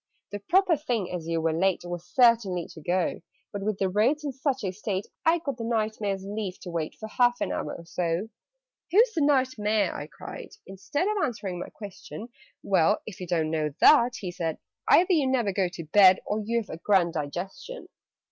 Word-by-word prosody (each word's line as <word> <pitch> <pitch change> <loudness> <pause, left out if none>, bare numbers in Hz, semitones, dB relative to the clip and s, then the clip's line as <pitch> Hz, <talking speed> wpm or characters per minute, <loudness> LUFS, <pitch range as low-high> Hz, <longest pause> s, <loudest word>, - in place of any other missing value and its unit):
"The 205 - -4
proper 360 - +3
thing, 240 - -2
as 175 -3 -5
you 165 0 0
were 160 0 +1
late, 190 +3 +1
Was 175 -1 -5
certainly 225 -9 +3
to 160 - -12
go: 180 +3 -1 0.3
But, 200 - -4
with 210 0 -1
the 195 - +1
roads 230 +11 +1
in 290 - -2
such 265 -1 -2
a 190 - -1
state, 195 0 -3 0.2
I 330 +1 +5
got 285 -7 -4
the 230 - -5
Knight 220 -2 -1
Mayor's 195 -2 -2
leave 200 -2 -4
to 180 - -7
wait 165 -2 -3
For 220 - -8
half 245 +2 +2
an - - -1
hour - - -3
or 170 - -10
so." 175 +4 -2 0.6
"Who's 445 +6 +4
the 325 - 0
Knight 260 -4 +2
Mayor?" 210 -2 +1
I 145 - -6
cried. - - -10
Instead 285 - -3
Of 425 0 0
answering 195 -7 -3
my - - -6
question, 210 +2 -9 0.3
"Well! 195 +1 +2
If 205 -4 -9
you 180 - -5
don't 160 -3 0
know 155 -3 -1
that," 245 -5 +6
he 185 -3 -5
said, 165 -3 -3 0.3
"Either 365 +2 +5
you 295 -6 +3
never 240 -7 +1
go 190 -1 +1
to 175 -1 -8
bed, 185 +3 +6
Or 210 - -1
you've 230 0 -2
a - - -6
grand 175 -1 +2
digestion! 180 - -5
205 Hz, 205 wpm, -27 LUFS, 180-245 Hz, 0.6 s, that